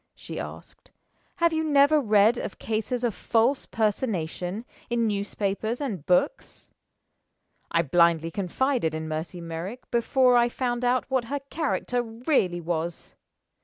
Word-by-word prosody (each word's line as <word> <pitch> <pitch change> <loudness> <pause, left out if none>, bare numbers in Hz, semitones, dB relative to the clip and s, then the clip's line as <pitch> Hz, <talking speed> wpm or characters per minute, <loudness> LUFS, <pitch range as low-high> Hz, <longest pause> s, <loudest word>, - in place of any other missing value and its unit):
she - - -7
asked. - - -9 0.5
"Have 335 -1 +2
you 320 0 0
never 295 0 +4
read 215 0 +4
of - - -5
cases 225 +3 -2
of 235 -3 +1
false 235 +8 +1
personation, 205 -2 -2 0.2
in 235 -1 +1
newspapers 205 +2 -2
and 220 - -3
books? 180 - 0 1.0
I 170 0 +2
blindly 165 +1 +3
confided 200 - 0
in 160 0 -4
Mercy 160 +3 -4
Merrick 170 +8 -7
before 250 +2 +3
I 240 0 +4
found 245 0 -2
out 245 +1 +2
what 260 -3 +1
her 280 +3 -3
character 280 -5 -1
really 225 - 0
was. 170 0 -3
225 Hz, 130 wpm, -26 LUFS, 175-255 Hz, 1.0 s, never